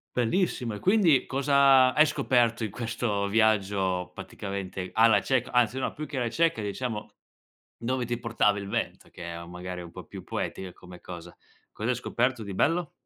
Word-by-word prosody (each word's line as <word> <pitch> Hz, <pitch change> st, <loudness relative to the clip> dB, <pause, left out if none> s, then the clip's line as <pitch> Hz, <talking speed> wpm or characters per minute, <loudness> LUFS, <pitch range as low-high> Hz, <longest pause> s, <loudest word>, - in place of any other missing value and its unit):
Bellissimo, 125 Hz, -, 0 dB
e 105 Hz, -, -6 dB
quindi 180 Hz, -, +4 dB
cosa 135 Hz, -2 st, +4 dB
hai 155 Hz, -, +6 dB
scoperto 120 Hz, -6 st, +1 dB
in -, -, -4 dB
questo 115 Hz, -2 st, -2 dB
viaggio 100 Hz, -4 st, +1 dB
praticamente 95 Hz, -1 st, -6 dB
alla 110 Hz, -2 st, +5 dB
cieca, 130 Hz, +1 st, 0 dB
anzi 125 Hz, +1 st, +2 dB
no -, -, -2 dB
più 155 Hz, -, -6 dB
che 150 Hz, -, -6 dB
alla 120 Hz, -2 st, 0 dB
cieca 165 Hz, 0 st, +1 dB
diciamo, 105 Hz, +1 st, -4 dB, 0.7 s
dove 125 Hz, +1 st, -2 dB
ti 120 Hz, +1 st, -2 dB
portava 115 Hz, -3 st, +1 dB
il 100 Hz, -, -7 dB
vento -, -, -3 dB
che 85 Hz, -, -10 dB
è 85 Hz, 0 st, -6 dB
u 85 Hz, -, -11 dB
magari 90 Hz, +1 st, -6 dB
è -, -, -6 dB
un 85 Hz, -, -10 dB
po' -, -, -10 dB
più -, -, -10 dB
poetica 95 Hz, -1 st, -4 dB
come 90 Hz, 0 st, -13 dB
cosa. 85 Hz, -1 st, -10 dB, 0.4 s
Cos'hai 120 Hz, +3 st, -1 dB
scoperto 125 Hz, -1 st, -1 dB
di 100 Hz, -1 st, -6 dB
bello? 165 Hz, -, +1 dB
115 Hz, 180 wpm, -27 LUFS, 95-130 Hz, 0.7 s, hai